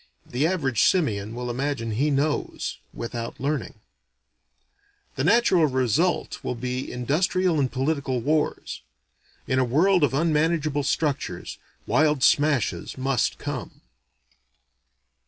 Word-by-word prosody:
(The 135 +6 0
average 140 - 0
simian 110 - +1
will 125 0 -3
imagine 130 -2 -2
he 135 +8 +1
knows 145 +1 -1
without 115 -1 -6
learning.) 140 -1 -2 1.4
The 135 - -1
natural 190 -3 +4
result 130 - 0
will - - -2
be 125 +2 -4
industrial 165 +6 +1
and 130 -3 +1
political 135 -1 -1
wars. 150 +5 -1 0.6
In 130 - +1
a - - +4
world 165 +8 +3
of 135 -2 +2
unmanageable 155 -1 +1
structures, 145 0 -2 0.3
wild 150 -3 +2
smashes 140 - +2
must 130 -2 0
come. - - -6
140 Hz, 110 wpm, -25 LUFS, 125-155 Hz, 1.4 s, natural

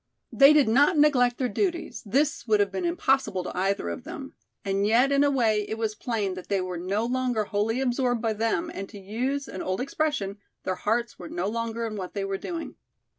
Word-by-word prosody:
They 275 +1 +7
did 300 -4 +5
not 285 +9 +4
neglect 250 -5 +4
their 255 - 0
duties, 345 +4 -2
this 285 +6 +1
would 215 -1 +4
have 200 -1 +2
been 195 - -2
impossible 270 - +1
to - - -6
either 190 - 0
of 85 - -5
them, - - -8 0.3
and 195 +1 +1
yet 245 +5 +4
in 280 0 +4
a 285 - +4
way 225 -6 +2
it 220 - -3
was 220 -1 -1
plain 215 -4 -2
that 185 -1 -8
they 200 -1 +2
were 185 -2 -4
no 200 +5 -1
longer 250 -2 0
wholly 210 +4 -1
absorbed 245 -2 +1
by 225 -1 0
them 230 +11 -1
and 195 0 -6
to 210 - -10
use 250 +8 -2
an 185 - -6
old 185 0 -2
expression, 255 -7 -2 0.2
their 185 - -1
hearts 230 +5 -1
were 175 - -8
no 175 +2 -2
longer 230 +1 -2
in 215 -2 -4
what 185 0 -6
they 200 -1 -1
were 195 0 -3
doing. 335 -2 -6
225 Hz, 220 wpm, -26 LUFS, 200-270 Hz, 0.3 s, They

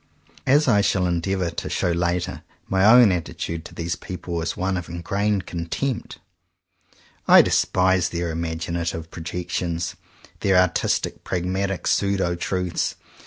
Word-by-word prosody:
As 145 +3 +4
I 105 -5 +5
shall 95 -2 +1
endeavour 90 +1 -1
to - - -5
show 90 - 0
later, 85 +1 -1 0.3
my 95 0 +1
own 115 0 +8
attitude 85 -1 -3
to - - -11
these 85 0 -2
people 90 -2 -5
is 80 - -3
one 95 +1 0
of 90 -1 -5
in 85 0 -6
grained 100 0 0
contempt. 90 +10 -3 1.1
I - - +9
despise 95 -1 +2
their 85 -1 -3
imag 80 0 -3
inative 85 -1 -3
projections, 85 0 -3 0.4
their 95 -1 +2
artistic, 90 -2 +1
pragmatic 95 +1 -2
pseudo 100 -3 +1
truths. 90 0 -2
90 Hz, 135 wpm, -23 LUFS, 85-95 Hz, 1.1 s, I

